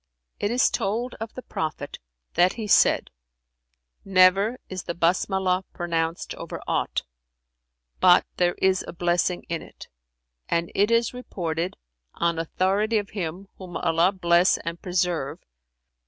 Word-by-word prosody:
"It 205 - 0
is 245 +3 +3
told 230 +6 -1
of 225 0 -6
the 255 - -7
Prophet 155 -2 -4 0.3
that 180 +2 +4
he 225 -2 -5
said, 205 - +4 0.9
'Never 195 +4 +4
is 185 -1 -6
the 170 - -4
Basmalah 185 +2 +1
pronounced 165 -1 -2
over - - -7
aught, - - -1 1.0
but 180 -1 +6
there 175 -1 +2
is 190 -1 +2
a - - -6
blessing 175 +1 0
in 165 -1 -3
it;' - - -13 0.6
and 170 0 0
it 205 +2 +3
is 230 0 +2
reported, 175 -8 -4 0.4
on 170 -1 0
authority 195 +7 +1
of 205 -1 -3
Him 185 0 -5
(whom 185 -2 -6
Allah 165 +3 +2
bless 175 -1 +3
and 170 0 -4
preserve!) 175 -6 -1
180 Hz, 135 wpm, -25 LUFS, 170-200 Hz, 1.0 s, but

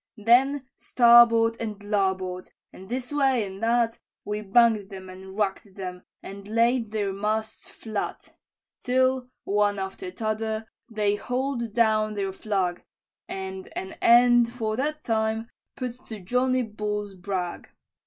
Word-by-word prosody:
"Then 255 +5 +3
starboard 235 -1 +5
and 210 -3 -5
larboard, 190 -3 -1 0.2
and 190 +1 -12
this 250 +3 -3
way 265 -6 +2
and 190 +1 -9
that, 230 0 +1 0.3
We 210 0 -3
bang'd 215 -1 +3
them 190 -2 -9
and 190 +1 -11
raked 200 -1 -2
them, 180 -2 -6 0.2
and 200 +1 -9
laid 230 +1 +2
their 205 -2 -2
masts 215 +2 -3
flat, 215 -2 -5 0.5
Till, 255 0 +1
one 205 0 +1
after 195 - -5
t'other, 220 -5 -3 0.2
they 210 -2 0
haul'd 250 -2 -2
down 215 -2 +2
their 195 -1 -2
flag, 190 -4 -2 0.4
And 190 0 -6
an 190 - -5
end, 240 0 +6
for 220 -3 -2
that 300 +5 -2
time, 220 0 -1 0.2
put 250 -1 -6
to 220 -2 -7
Johnny 250 +6 +1
Bull's 210 -2 -4
brag. 185 -1 -4
220 Hz, 135 wpm, -26 LUFS, 200-240 Hz, 0.5 s, end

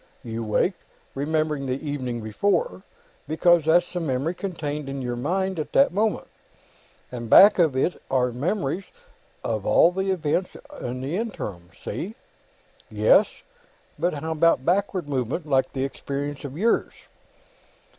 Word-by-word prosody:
You 115 0 -4
wake, 110 - +1 0.4
remembering 150 0 -1
the 130 +1 -2
evening 130 -6 -4
before, 200 - 0 0.5
because 165 +1 +3
that's 175 +3 +3
the 180 - -1
memory 145 +1 -1
contained 150 -6 -4
in 135 0 -4
your 125 -2 -3
mind 185 +8 -1
at 155 - -5
that 280 - +5
moment, 215 +2 0 0.9
and 120 -2 -6
back 200 - +8
of 160 -6 +3
it 135 +7 0
are 125 -2 +2
memories 170 - -2 0.6
of - - -2
all 170 - +5
the 190 +1 -2
events 180 0 -1 0.2
in 125 +1 -4
the 145 +7 -2
interim. 105 - -5 0.2
See?" 210 +6 -4 0.7
"Yes. - - +4 0.7
But 175 -2 0
how 160 +3 -4
about 160 -4 +3
backward 185 -2 0
movement, 135 +4 -2
like 135 -3 +1
this 135 0 -2
experience 140 +1 -5
of 140 +1 -7
yours?" 225 +6 +1
150 Hz, 140 wpm, -24 LUFS, 130-180 Hz, 0.9 s, back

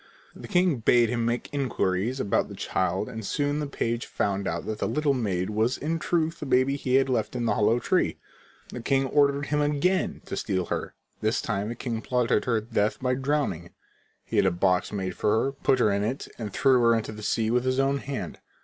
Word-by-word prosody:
The - - -9
king 180 -6 +2
bade 115 +1 +4
him 120 -1 0
make 120 +1 -1
inquiries 120 -3 -1
about 100 - +1
the - - -8
child 95 +2 -1
and 110 -3 -6
soon 145 +7 -1
the 150 - -2
page 120 -4 -2
found 100 -1 -1
out 85 +1 -3
that 110 0 -4
the - - 0
little 150 -2 +1
maid 100 -6 -1
was 110 +4 +1
in 165 +3 -2
truth 165 0 0
the 150 - -5
baby 130 +1 +3
he 130 -2 0
had 135 0 +4
left 125 -2 -1
in 120 -1 -1
the - - +2
hollow 110 +2 +3
tree. - - +1 0.5
The 125 - -7
king 135 +3 +1
ordered 140 0 +2
him 150 +1 0
again 150 +6 0
to - - -5
steal 95 -4 -1
her. - - -4 0.3
This 110 +3 +1
time 105 -1 -2
the 120 - -4
king 115 -2 -4
plotted 125 -4 +1
her 115 -3 +2
death 110 -1 -1
by 125 0 0
drowning. 135 - -2 0.5
He - - -3
had - - +4
a - - +5
box 90 +1 +1
made 95 -3 -3
for 105 +1 +2
her, 135 - 0
put 135 -1 +1
her 110 -4 +3
in 100 0 0
it, 125 +6 -3
and 105 -3 -4
threw 130 +5 +4
her 115 0 +5
into 110 -1 -2
the 105 0 -9
sea 110 +1 0
with 125 +1 +2
his 130 +1 0
own 135 +1 +2
hand. 140 -1 -5
120 Hz, 220 wpm, -26 LUFS, 105-135 Hz, 0.5 s, a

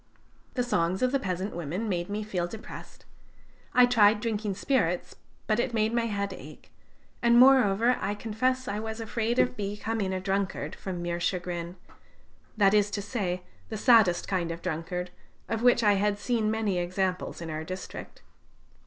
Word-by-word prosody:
The 250 - +1
songs 190 -4 0
of 255 - +3
the 275 - +2
peasant 185 -2 -3
women 175 +7 -3
made 175 -3 -2
me 210 +1 -2
feel 180 -5 -2
depressed. 220 +4 -10 0.7
I 250 0 +8
tried 220 -3 +5
drinking 215 -3 -2
spirits, 185 -7 0 0.3
but 215 +1 +1
it 240 0 -1
made 220 +1 +1
my 235 -1 +1
head 200 -2 -2
ache; 155 -3 -12 0.5
and 235 0 +5
moreover, 245 -3 +5
I 200 +2 -1
confess 255 +5 -1
I 205 +1 -2
was 220 +1 -5
afraid 230 +1 -1
of 250 - +3
becoming 205 -1 -2
a 190 - -1
drunkard 195 +1 -2
from 180 -3 -5
mere 175 0 -2
chagrin, 175 -1 -2 0.8
that 200 -1 +5
is 210 -1 +4
to 205 0 -3
say, 185 -5 -2 0.3
the 220 - -4
saddest 215 -6 +4
kind 180 -3 -1
of 165 0 -6
drunkard, 180 +3 -3 0.4
of 225 0 -2
which 245 -1 +4
I 205 -1 +5
had 205 +1 +1
seen 220 0 0
many 215 -4 0
examples 185 +1 -2
in 165 -1 -6
our 155 0 -4
district. 185 +3 -8
205 Hz, 170 wpm, -28 LUFS, 180-225 Hz, 0.8 s, I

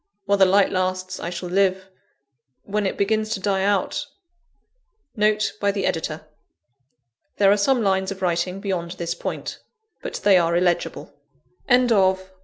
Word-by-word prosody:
While 200 0 +1
the 190 - +7
light 195 +1 +3
lasts, 185 0 -2
I 170 - -4
shall 180 0 -6
live; 190 0 +1 0.8
when 205 0 -1
it - - -4
begins 215 +2 0
to - - -6
die 195 0 0
out 205 +8 0 0.5
* - - -49
NOTE 215 0 +1
BY 200 0 +2
THE 200 - -2
EDITOR. 160 -1 -3 0.5
* 120 -3 -51
There 200 -1 +5
are - - +5
some 235 +4 +2
lines 190 -1 +1
of 190 -1 -7
writing 180 +2 -1
beyond 180 -4 -3
this 170 -2 -3
point; 175 - -5 0.4
but - - -6
they 195 -3 +6
are 170 0 +1
illegible. 175 -2 -1 0.6
LETTERS 250 0 +6
IN - - +1
CONCLUSION. 190 -3 +2
190 Hz, 170 wpm, -22 LUFS, 180-205 Hz, 0.8 s, the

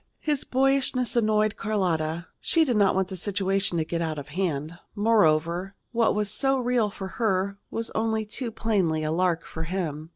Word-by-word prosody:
His 295 -3 -1
boyishness 265 -1 +1
annoyed 215 -2 +2
Carlotta. 170 -6 -1
She 330 -1 +3
did 250 -5 0
not 200 -3 +4
want 190 0 0
the 190 - -5
situation 195 -1 0
to 160 - 0
get 170 +1 -2
out 160 -2 -2
of 145 0 -7
hand. 165 -1 -2 0.2
Moreover, 185 -3 +2 0.2
what 230 -3 +2
was 210 -1 0
so 270 +4 +2
real 245 -3 +1
for 195 -1 -7
her 200 -2 0
was 230 0 -4
only 220 0 0
too 235 +3 -4
plainly 190 -9 0
a 155 - -1
lark 170 0 +1
for 160 - -7
him. 160 -3 -3
195 Hz, 175 wpm, -26 LUFS, 170-225 Hz, 0.2 s, not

